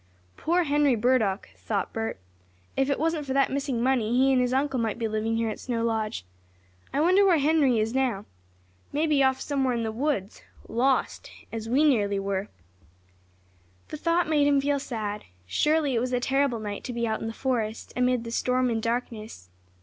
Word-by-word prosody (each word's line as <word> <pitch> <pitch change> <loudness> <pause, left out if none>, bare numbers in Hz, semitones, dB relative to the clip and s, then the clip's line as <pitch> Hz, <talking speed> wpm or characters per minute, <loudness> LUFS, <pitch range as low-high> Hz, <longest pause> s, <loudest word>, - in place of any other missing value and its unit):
"Poor 350 +2 +1
Henry 290 -3 +3
Burdock!" 220 -4 +1
thought 200 -4 -3
Bert. 225 0 -3 0.6
"If 270 +1 +1
it 280 - +1
wasn't 320 0 0
for 265 - -1
that 275 0 +2
missing 270 -3 -1
money 245 -3 +1
he 265 +1 +4
and 255 - +3
his 250 0 0
uncle 270 0 0
might 225 -2 -1
be 230 -2 -1
living 220 +1 -1
here 230 -1 0
at - - -7
Snow 235 -2 -2
Lodge. 220 - -2 0.7
I - - -1
wonder 365 +6 +5
where 370 -4 +5
Henry 290 -4 +3
is 220 +1 0
now? 250 -7 0 0.7
Maybe 300 -1 +2
off 265 -1 +3
somewhere 270 -4 0
in 230 - -1
the 220 - -2
woods, 230 -4 -2 0.3
lost 255 +3 0 0.2
as 225 0 -5
we 270 +5 +3
nearly 210 -9 +2
were!" 195 0 -2 1.4
The 305 - -5
thought 335 +2 +1
made 295 -2 +3
him 285 -1 +4
feel 285 +1 +1
sad. 210 -5 -4 0.2
Surely 300 - +1
it 235 - +2
was 250 +2 -2
a 250 - +2
terrible 265 -1 +1
night 205 -1 -5
to 250 - -4
be 235 0 -1
out 220 -1 -2
in - - -3
the - - -3
forest, 225 -3 -3
amid 250 -1 +1
the 230 - -6
storm 250 +1 +1
and 225 -1 -1
darkness. 225 - -4
250 Hz, 190 wpm, -26 LUFS, 225-280 Hz, 1.4 s, wonder